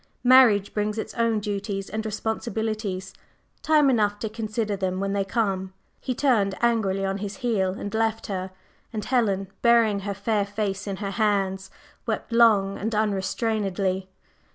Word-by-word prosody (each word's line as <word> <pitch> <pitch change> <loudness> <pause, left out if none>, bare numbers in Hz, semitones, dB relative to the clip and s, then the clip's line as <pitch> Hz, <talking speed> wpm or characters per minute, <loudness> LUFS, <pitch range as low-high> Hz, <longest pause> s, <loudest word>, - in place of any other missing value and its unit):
Marriage 245 -6 +6
brings 210 +1 -1
its 220 - -4
own 230 -2 +1
duties 200 -1 -3
and 220 0 -4
responsibilities, 215 -3 -3 0.5
time 305 -2 +4
enough 210 -5 +2
to 220 +1 -4
consider 215 -1 -2
them 185 -1 -2
when 195 0 -1
they 200 -1 +1
come." 195 -3 -1 0.3
He 255 - -3
turned 215 -9 +2
angrily 210 -5 +1
on 195 +1 -2
his 205 0 -5
heel 190 -6 +1
and 205 +1 -6
left 225 0 0
her, 190 -2 -3 0.4
and 215 -2 -4
Helen, 200 -7 +1
burying 230 -3 +4
her 200 0 -4
fair 205 0 0
face 205 -1 -3
in 195 - -2
her 200 0 -4
hands, 195 -3 0 0.4
wept - - -3
long 215 -4 +4
and 220 +2 -2
unrestrainedly. 195 -2 -1
205 Hz, 155 wpm, -25 LUFS, 195-225 Hz, 0.5 s, Marriage